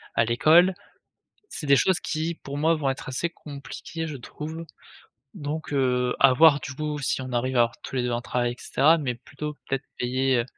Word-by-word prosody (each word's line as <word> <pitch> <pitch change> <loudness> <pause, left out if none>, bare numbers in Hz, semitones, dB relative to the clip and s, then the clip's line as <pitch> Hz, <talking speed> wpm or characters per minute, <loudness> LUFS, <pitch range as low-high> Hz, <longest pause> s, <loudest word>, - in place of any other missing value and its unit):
à 115 - +3
l'école. 160 +11 +5 0.7
C'est 165 - -5
des 140 -1 +5
choses 185 +7 +2
qui 160 +1 -2
pour 140 -2 -7
moi, 160 +3 +3
vont 145 -4 -1
être 135 - -4
assez 130 +6 -1
compliquées 155 +2 -7
je 150 -3 -6
trouve. 160 +6 -7 0.7
Donc 155 -3 -5
heu, 125 -2 +1
à 135 -1 +7
voir 145 +2 +6
du 130 - -7
coup 150 +1 -3
si 135 - -1
on 130 -1 -6
arrive 130 +2 0
à - - +5
avoir 115 +1 0
tous 135 - -6
les 125 - 0
2 125 - -1
un 120 - -1
travail 120 -1 -1
et - - -11
cetera, 160 +4 +3
mais 130 -6 -2
plutôt 150 +4 -7
peut-être 135 -1 -2
payer, 130 +1 +1
heu, 120 - +1
140 Hz, 210 wpm, -25 LUFS, 125-155 Hz, 0.7 s, à